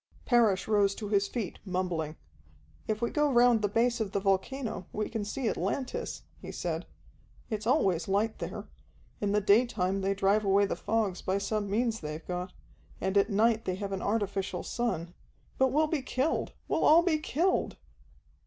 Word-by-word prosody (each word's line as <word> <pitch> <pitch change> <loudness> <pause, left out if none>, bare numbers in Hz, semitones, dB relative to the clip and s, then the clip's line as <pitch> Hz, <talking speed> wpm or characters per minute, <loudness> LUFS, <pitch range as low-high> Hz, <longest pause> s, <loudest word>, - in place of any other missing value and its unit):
Parrish 225 -7 +3
rose 205 -2 +3
to 210 -3 -6
his 200 -1 +2
feet, 215 -7 -4
mumbling. 180 -5 -2 0.7
"If 215 +2 -1
we 235 - 0
go 295 -1 +2
round 240 -2 +5
the 205 - +2
base 235 +4 +1
of 210 -3 -2
the 200 - +1
volcano 195 +2 -1
we 215 0 -2
can 225 -3 -3
see 225 +4 -3
Atlantis," 260 - -2 0.2
he - - -7
said. - - -3 0.6
"It's 215 0 -3
always 185 -9 +2
light 205 +3 0
there. - - -5 0.5
In 205 -1 0
the 210 0 +2
daytime 200 -2 +2
they 195 +1 0
drive 200 +2 +2
away 200 0 +4
the - - -2
fogs 215 -5 -1
by 190 +1 0
some 205 0 -2
means 225 +2 0
they've 155 +1 -6
got, 180 +1 -3 0.5
and 190 +1 -1
at 200 +1 +4
night 225 +2 +2
they 185 - -1
have 200 +1 -5
an 195 - -3
artificial 200 -4 -1
sun. 175 -8 -2 0.5
But 265 - +5
we'll 305 +4 +3
be 310 -2 -1
killed, 265 +3 -1
we'll - - 0
all 330 +3 +7
be 325 -4 +2
killed." 335 +5 0
210 Hz, 175 wpm, -30 LUFS, 195-235 Hz, 0.7 s, all